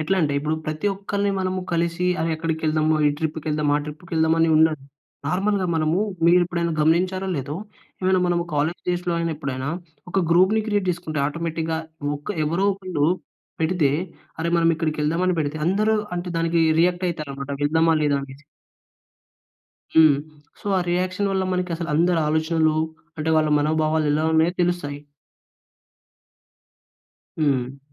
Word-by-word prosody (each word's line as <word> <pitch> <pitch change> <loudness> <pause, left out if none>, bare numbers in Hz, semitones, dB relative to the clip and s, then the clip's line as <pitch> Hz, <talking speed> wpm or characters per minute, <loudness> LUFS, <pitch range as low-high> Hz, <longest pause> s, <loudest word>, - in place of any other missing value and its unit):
ఎట్లంటే 155 -2 +1
ఇప్పుడు 150 +2 -1
ప్రతి 155 +6 -3
ఒక్కలిని 200 +1 -1
మనము 185 0 -1
కలిసి 170 +1 0
అరె 165 +1 0
ఎక్కడికెళ్దామా, 155 -1 0
ఈ - - +6
ట్రిప్‌కెళ్దామా, 155 -2 -1
ఆ - - -4
ట్రిప్‌కెళ్దామా 160 +1 -1
అని 165 - +4
ఉండదు. 155 -3 +3 0.4
నార్మల్‌గా 195 +4 +1
మనము 160 +3 +1 0.3
మీరు 175 +1 +6
ఎప్పుడైనా 170 -1 -1
గమనించారో 185 +4 +2
లేదో, 140 +3 -4 0.4
ఏమైనా 185 0 +2
మన 175 -1 +1 0.2
కాలేజ్ 155 +4 0
డేస్‌లో 180 0 0
అయిన 165 0 -1
ఎప్పుడైనా 135 -2 -4 0.4
ఒక 195 - +1
గ్రూప్‌‌ని 190 +6 +4
క్రియేట్ 205 -3 0
జేసుకుంటే 165 -4 -3
ఆటోమేటిక్‌గా 160 +1 -2 0.4
ఒక 145 - -11 0.2
ఎవరో 170 +6 0
ఒకళ్ళు 185 -6 -1 0.5
పెడితే, 160 -3 +2 0.5
అరె 165 +1 0
మనం 165 0 +3
ఇక్కడికెళ్దామని 165 +3 0
పెడితే 150 0 -1
అందరూ 210 +4 +2 0.2
అంటే 175 +1 -4
దానికి 165 0 +1 0.2
రియాక్ట్ 180 +1 +2
అయితారనమాట 140 -4 -5
వెళ్దామా 160 +2 +3
లేదా 145 -1 +2
అనేసి. 135 +1 -11 1.5
హ్మ్. 155 -3 +7 0.4
సో - - -13
ఆ - - +1
రియాక్షన్ 185 +3 0
వల్ల 190 -1 0
మనకి 180 0 -1
అసలు 170 0 -5
అందరి 170 +2 +3
ఆలోచనలు, 160 0 +1 0.4
అంటే 160 +1 -1
వాళ్ళ 155 -1 +3
మనోభావాలు 155 +1 +1
ఎలా 155 +1 +1
ఉన్నాయో 160 +2 +3
తెలుస్తాయి. 170 -5 -1 2.4
హ్మ్. 135 -3 0
165 Hz, 135 wpm, -23 LUFS, 155-180 Hz, 2.4 s, హ్మ్